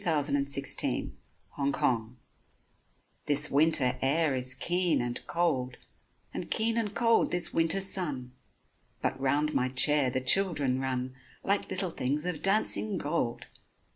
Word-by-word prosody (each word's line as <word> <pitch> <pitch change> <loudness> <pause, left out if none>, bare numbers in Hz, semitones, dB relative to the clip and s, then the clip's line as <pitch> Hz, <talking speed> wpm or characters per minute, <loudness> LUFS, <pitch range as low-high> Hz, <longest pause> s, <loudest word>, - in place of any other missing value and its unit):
LE - - -12
JARDIN 145 -4 +1
DES 140 0 -1
TUILERIES 125 -4 -3 1.1
THIS 145 +1 +2
winter 140 -4 +2
air 150 +2 +2
is 130 0 0
keen 175 -1 0
and 120 0 -4
cold, 135 -8 -1 0.6
And - - -5
keen 225 +1 +1
and 215 -3 -2
cold 230 -1 +3
this 175 0 0
winter 165 +3 +2
sun, 150 -10 -2 0.7
But 135 - -2
round 145 +3 +1
my 130 +1 +1
chair 140 +1 +4
the 130 +1 -1
children 140 -2 +2
run 130 -1 -3 0.3
Like 200 +1 0
little 185 -1 -2
things 145 +3 -2
of 170 -4 -3
dancing 210 0 0
gold. 145 -7 -2
145 Hz, 135 wpm, -29 LUFS, 130-175 Hz, 1.1 s, chair